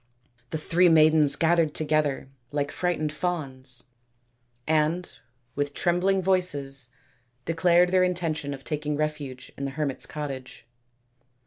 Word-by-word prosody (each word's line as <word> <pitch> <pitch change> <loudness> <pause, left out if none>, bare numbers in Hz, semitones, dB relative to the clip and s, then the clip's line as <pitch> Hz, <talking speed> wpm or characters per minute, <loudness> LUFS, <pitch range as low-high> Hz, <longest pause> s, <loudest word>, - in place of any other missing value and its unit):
The - - -2
three 175 +3 +3
maidens 155 -2 +6
gathered 165 -2 +2
together 150 -3 0 0.2
like 145 0 -1
frightened 160 -4 -1
fawns, 135 -7 -4 0.8
and 160 +3 +1 0.5
with 145 0 -3
trembling 185 +2 +1
voices 145 -9 0 0.6
declared 175 +1 +3
their 185 0 +4
intention 165 -6 -1
of 135 - -14
taking 150 -1 -3
refuge 145 -4 -4
in 140 - -4
the - - -2
hermits' 145 -4 -1
cottage. 135 -4 -7
155 Hz, 115 wpm, -26 LUFS, 140-175 Hz, 0.8 s, maidens